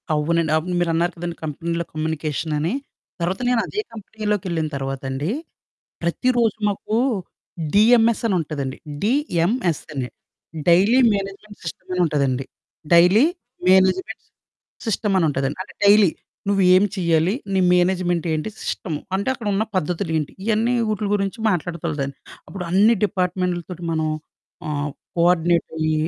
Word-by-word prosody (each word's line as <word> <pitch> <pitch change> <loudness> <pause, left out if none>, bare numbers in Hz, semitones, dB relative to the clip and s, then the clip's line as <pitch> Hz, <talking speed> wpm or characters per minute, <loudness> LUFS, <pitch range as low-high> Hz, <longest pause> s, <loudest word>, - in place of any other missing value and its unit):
అవునండి. 160 +1 +1
అప్పుడు 180 +3 -2
మీరున్నారు 170 0 +1
కదండీ 170 0 -4
కంపెనీలో 170 +2 -3
కమ్యూనికేషన్ 155 0 -2
అని. 165 +7 0 0.5
తర్వాత 180 +6 -1
నేను 250 -2 +3
అదే 425 - -2
కంపెనీలోకెళ్ళిన 205 -6 -2
తర్వాతండి. 135 +3 -3 0.7
ప్రతిరోోజు 230 +5 +1
మాకు 205 +2 -3 0.8
డిఎంఎస్ 230 +2 +5
అని 200 - +1
ఉంటదండి. 145 -4 -4 0.2
డి.ఎం.ఎస్. 205 - +1
అని. 130 -3 -2 0.6
డైలీ 195 +9 +5
మేనేజ్‌మెంట్ 200 +1 -5
సిస్టమని 180 +3 -3
ఉంటదండి. 135 -4 0 0.5
డైలీ, 180 - +6 0.4
మేనేజ్‌మెంట్, 190 +3 +3 0.6
సిస్టమని 195 -4 +1
ఉంటదండి. 135 0 -2
అంటే - - -16
డైలీ 200 -2 +7 0.4
నువ్వు 200 -1 +2
ఏం 185 - +5
చేయాలి? 170 -1 +2 0.2
నీ 190 - +3
మేనేజ్‌మెంట్ 180 -1 +1
ఏంటి? 155 +6 -2
సిస్టము. 155 -5 -3 0.2
అంటే 200 +6 -1
అక్కడ 235 -4 -6
ఉన్న 200 +2 +2
పద్ధతులు 180 0 -1
ఏంటి? 150 -2 -3
ఇయన్నీ 225 +2 +2 0.2
వూటుల 210 -1 -1
గురించి 195 +1 -2
మాట్లాడుతులదండి. 155 -6 -2 0.3
అప్పుడు 195 -2 -6
అన్ని 210 +5 +5
డిపార్ట్‌మెంట్లతోటి 180 -2 -2
మనం 160 -1 0 0.6
ఆహ్, 145 0 -2 0.3
కో 170 - +1
ఆర్డినేటయ్యి 165 -2 +1
180 Hz, 120 wpm, -22 LUFS, 160-200 Hz, 0.8 s, డైలీ